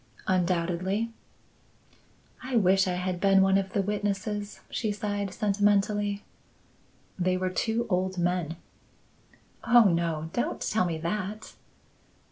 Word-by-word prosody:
"Undoubtedly." 185 +4 0 1.3
"I 255 0 -4
wish 195 -3 +4
I 180 - 0
had 180 0 -2
been 195 -1 +5
one 195 0 +3
of 195 -1 0
the 200 - +1
witnesses," 205 0 -3
she 220 -3 -1
sighed 205 -1 -3
sentimentally. 205 0 +1 1.0
"They 185 0 +1
were 185 0 -1
two 225 +4 0
old 185 -1 0
men." 175 -2 -1 1.1
"Oh, 240 0 +6
no! 165 -4 0
Don't 240 - -1
tell 215 -4 +1
me 165 -2 -2
that." 200 +5 -4
195 Hz, 115 wpm, -28 LUFS, 180-205 Hz, 1.3 s, Oh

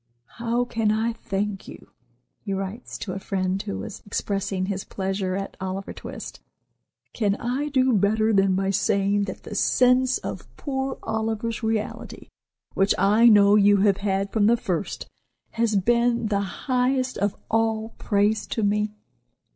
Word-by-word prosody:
"How 235 +1 +1
can 225 -3 0
I 225 +2 0
thank 200 -2 -3
you?" - - -12 0.5
he 200 - -4
writes 195 +5 -5
to 185 - -5
a 190 - -4
friend 190 -1 -1
who 95 - -4
was 95 - -7
expressing 195 -2 -2
his 195 0 -3
pleasure 190 -1 -2
at 195 0 -4
"Oliver 190 +1 -4
Twist." - - -8 0.7
"Can 205 -3 +1
I 255 +7 -2
do 260 -2 +3
better 215 +2 +2
than 195 -1 +3
by 195 +1 0
saying 200 +1 +1
that 190 - -7
the - - -8
sense 250 +4 +3
of - - -7
poor 265 -1 -3
Oliver's 220 +1 -2
reality, 220 -1 -3 0.4
which 195 +1 +2
I 210 +5 +5
know 205 -1 +6
you 205 -1 +5
have 200 -2 +3
had 195 0 -1
from 210 -2 +3
the 235 +1 +4
first, 185 -5 -3 0.4
has 230 -2 0
been 235 +3 +2
the 200 -2 +1 0.3
highest 255 0 +1
of 205 +1 0
all 225 0 0
praise 210 +1 +1
to 225 - -2
me? 210 +1 0
210 Hz, 155 wpm, -24 LUFS, 195-230 Hz, 0.7 s, know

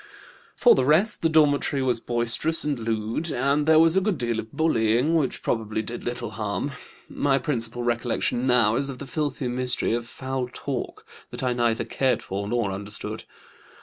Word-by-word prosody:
"For - - +6
the 130 - +2
rest 165 - +3
the 165 - +2
dormitory 145 -3 +2
was 125 -3 +1
boisterous 120 +8 0
and 145 -4 -1
lewd, 115 +7 -2
and 140 +2 0
there 160 0 +6
was 165 +1 +5
a 190 - +4
good 195 -3 0
deal 120 -3 -1
of 110 0 -7
bullying, 125 -2 +2
which 155 -5 0
probably 110 -1 -1
did 120 +3 -6
little 120 -2 -4
harm. 105 +6 -3 0.4
My 135 -1 +1
principal 120 -5 -1
recollection 120 +1 0
now 120 -3 +3
is 140 +1 -1
of 135 - -6
the 140 - -7
filthy 145 -2 -2
mystery 125 -1 0
of 120 0 -2
foul 130 0 -4
talk, 135 -1 -5 0.2
that - - -6
I 125 -1 +1
neither 120 -2 0
cared 130 -2 0
for 100 +1 -4
nor 115 -3 0
understood. 100 +2 -4
125 Hz, 180 wpm, -25 LUFS, 115-145 Hz, 0.4 s, For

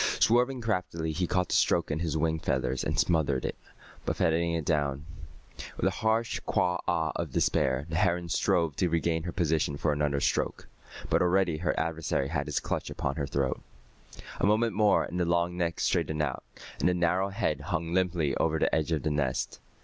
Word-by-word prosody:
Swerving 125 +2 +3
craftily, 90 -7 -2
he 90 +3 -1
caught 90 0 0
the - - -1
stroke 85 - +2
in 75 - -1
his 80 -2 -1
wing 80 +1 0
feathers 65 -3 -1
and 75 +1 -1
smothered 75 -6 +1
it, - - -3 0.5
buffeting 85 +1 +1
it 80 -2 -2
down. 70 -2 0 0.7
With - - -1
a - - +3
harsh 110 +1 0
quah 90 0 0
ah 80 -4 +1
of - - -3
despair, 65 +1 +1
the 80 0 -2
heron 90 -2 +1
strove 85 -2 +1
to 90 - +1
regain 80 0 0
her 85 +2 -4
position 80 -4 0
for 75 +1 +1
another 75 -1 0
stroke. - - -1 0.4
But - - +3
already 90 -2 +2
her 80 -1 -1
adversary 80 -4 -1
had 75 -2 -2
his - - 0
clutch - - -3
upon 70 +3 -3
her 70 -3 -2
throat. 70 -1 -1 0.8
A - - +2
moment 110 +1 +2
more 105 -1 +4
and 90 - -4
the 90 - +2
long 85 +1 +1
neck 85 -1 -1
straightened 75 0 0
out, 65 -4 -3 0.4
and - - +3
the 90 - +1
narrow 90 +3 +1
head 95 - -1
hung 85 -2 -3
limply 90 -6 +1
over 80 0 +1
the - - +1
edge 80 +1 +1
of 80 - 0
the 80 - 0
nest. 70 -4 -1
85 Hz, 195 wpm, -29 LUFS, 75-90 Hz, 0.8 s, more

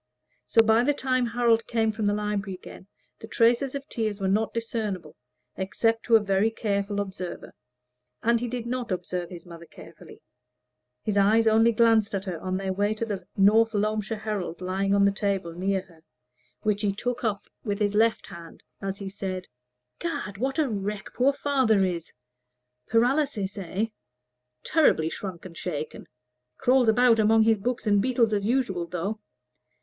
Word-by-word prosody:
So, 225 - +5
by 225 +1 +4
the 290 +2 +2
time 255 -3 0
Harold 230 -1 +2
came 225 -2 +1
from 215 -1 -2
the 205 - +2
library 210 -2 -2
again, 185 - -12 0.3
the 220 - -9
traces 240 +4 +2
of 275 +1 -5
tears 215 -6 -2
were 195 - -1
not 215 +3 +1
discernible, 215 -8 -4 0.4
except 225 +5 0
to 230 - +5
a - - +8
very 200 +1 +2
careful 205 -2 -2
observer. 190 -3 -6 0.7
And 235 0 +3
he 245 - -3
did 240 -1 -4
not 245 -2 -3
observe 180 -1 -3
his 175 -2 -10
mother 170 -1 -11
carefully; - - -14 0.8
his 205 -1 -1
eyes 215 +3 +4
only 225 +1 +5
glanced 225 -2 +3
at 195 - -2
her 180 -5 -5
on 185 0 -2
their 190 -1 -2
way 205 +2 0
to 230 - -3
the 195 -5 -5
North 220 +3 +4
Loamshire 215 +1 -1
Herald, 210 -6 -4
lying 190 +2 0
on 200 0 +4
the 200 - +4
table 195 -4 -2
near 190 +2 -1
her, 170 -4 -21 0.6
which 210 -2 0
he 200 -2 0
took 245 +3 -3
up 210 -3 -1 0.2
with 205 -2 -2
his 205 -1 0
left 225 +2 +2
hand, 170 -1 -12 0.2
as 195 0 -3
he 200 - -6
said 190 -1 -5 0.5
"Gad! 285 - -4
what 265 +4 -1
a 310 -3 +2
wreck 205 -2 -4
poor 260 +3 +3
father 260 -8 +2
is! 170 -3 -4 0.8
Paralysis, 235 -3 +1
eh? 195 +2 -2 0.8
Terribly 165 - +3
shrunk 185 -4 -7
and 175 -2 -10
shaken 155 -3 -5 0.5
crawls 250 -2 +3
about 235 0 +5
among 220 +1 +5
his 220 -1 +3
books 245 +4 -2
and 205 -2 +3
beetles 235 -2 +2
as 200 0 0
usual, 210 -9 0
though. 180 +5 -3
210 Hz, 170 wpm, -26 LUFS, 195-230 Hz, 0.8 s, a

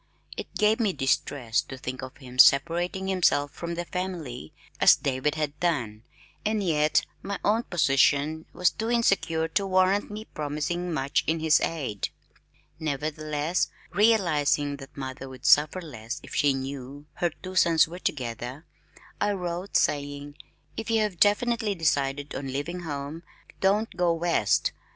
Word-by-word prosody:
It - - -7
gave 215 +1 +3
me 210 -5 +1
distress 135 -4 0
to 130 - -9
think 130 0 -5
of 130 0 -8
him 125 -2 -11
separating 170 +8 +4
himself 170 -6 +2
from 170 +2 -5
the 175 +1 -3
family 165 - -5 0.3
as - - +8
David 140 +2 -1
had 150 -1 -3
done, 120 -12 -1 0.4
and 215 -1 0
yet 155 -4 +2 0.2
my 200 0 -4
own 215 +3 +3
position 150 - +2
was 180 -1 +2
too 225 +1 -4
insecure 195 -9 +2
to 195 +4 0
warrant 185 +2 +2
me 210 +1 -7
promising 155 +4 -3
much 140 -2 0
in 160 +1 +1
his 160 -1 +4
aid. 135 -11 -2 0.7
Nevertheless, 155 +2 -1 0.2
realizing 165 -9 +2
that 135 0 -13
mother 130 0 -6
would 130 +1 -11
suffer 150 +5 +5
less 120 -5 -7
if - - -10
she 145 -2 +3
knew 135 +1 -6
her 175 - +1
two 185 +3 -10
sons 165 -3 +5
were 175 +3 -8
together, 125 +1 -4 0.6
I 205 0 +2
wrote, 180 +1 -2
saying, 145 0 -1 0.4
"If 225 - -4
you 225 -1 +3
have 205 -5 -2
definitely 215 0 +2
decided 145 -3 0
on 135 - -4
leaving 145 +7 -3
home, 150 -1 -5 0.4
don't 205 +3 +1
go 175 -2 +2
west. 165 -10 +1
155 Hz, 150 wpm, -27 LUFS, 140-185 Hz, 0.7 s, as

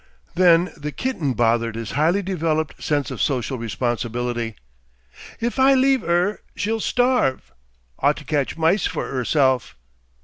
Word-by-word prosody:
Then 175 0 +4
the 150 0 -5
kitten 170 - -2
bothered 115 -1 +1
his 115 -2 -5
highly 170 +7 +1
developed 160 -4 -2
sense 145 -4 -1
of - - -5
social 130 -1 -1
responsibility. 120 0 -2 0.8
"If 235 +3 -2
I 270 +1 +6
leave 265 -3 +3
'er, 175 +4 +1
she'll 225 +2 -1
starve.... 245 - +1 0.5
Ought 145 +2 +2
to 150 - -9
catch 145 -1 -1
mice 165 +5 +2
for - - -4
'erself.... 130 -1 +1
150 Hz, 135 wpm, -22 LUFS, 125-195 Hz, 0.8 s, I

